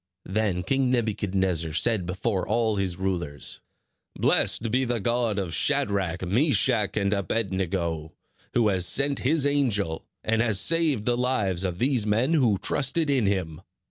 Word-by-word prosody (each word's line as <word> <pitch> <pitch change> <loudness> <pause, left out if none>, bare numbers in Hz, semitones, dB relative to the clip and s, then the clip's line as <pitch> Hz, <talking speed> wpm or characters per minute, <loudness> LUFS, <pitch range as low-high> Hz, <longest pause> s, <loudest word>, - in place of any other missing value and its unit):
Then 95 -2 -1
King 135 0 0
Nebuchadnezzar 95 -8 0
said 95 +1 +1
before 95 0 -2
all 110 -3 0
his 95 -3 -1
rulers: 85 -7 -3 0.5
"Blessed 115 -1 +1
be 130 +3 +1
the 120 -2 -1
God 120 0 -1
of 95 -4 -3
Shadrach, 100 - +1
Meshach, 110 - +2
and 100 -1 +1
Abed 100 +1 -2
nego, 85 -4 -3 0.4
who 115 -3 +3
has 90 -3 +2
sent 140 0 +2
his 145 +2 +1
angel, 110 - 0 0.2
and 110 0 +1
has 110 -5 +2
saved 155 - +1
the 120 - +1
lives 110 -8 0
of 90 -2 -3
these 125 -2 0
men 115 +9 +1
who 120 -10 +3
trusted 145 - 0
in 130 -7 +2
him. 90 -6 -2
105 Hz, 150 wpm, -25 LUFS, 95-125 Hz, 0.5 s, who